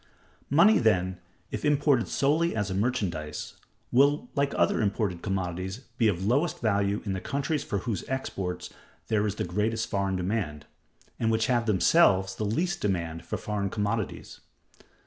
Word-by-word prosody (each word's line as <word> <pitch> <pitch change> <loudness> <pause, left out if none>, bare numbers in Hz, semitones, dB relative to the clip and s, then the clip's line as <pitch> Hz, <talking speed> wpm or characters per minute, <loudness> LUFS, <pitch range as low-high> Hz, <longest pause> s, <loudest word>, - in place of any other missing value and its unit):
Money, 180 +10 +6
then, 95 -5 +1 0.3
if - - -4
imported 145 -4 +3
solely 155 +3 +1
as 105 -3 -1
a - - -1
merchandise, 95 -8 -2 0.4
will, 145 - +3
like 140 -1 +1
other - - +2
imported 100 -4 -1
commodities, 95 +2 -3 0.2
be 115 - +4
of 95 -2 0
lowest 140 +10 +1
value 100 -2 +1
in 100 - -1
the 95 - -3
countries 145 +1 -1
for 100 - -2
whose 100 +2 -3
exports 90 -9 -4 0.4
there 105 -1 +2
is 100 - -2
the - - -2
greatest 105 +5 -1
foreign 100 -1 0
demand, 90 -6 -2 0.5
and 115 - +1
which 110 0 +2
have 120 -2 +1
themselves 95 - +4
the 100 - -4
least 170 - -1
demand 85 -5 -2
for - - -4
foreign 100 -2 -2
commodities. 105 0 -3
105 Hz, 155 wpm, -27 LUFS, 95-125 Hz, 0.5 s, Money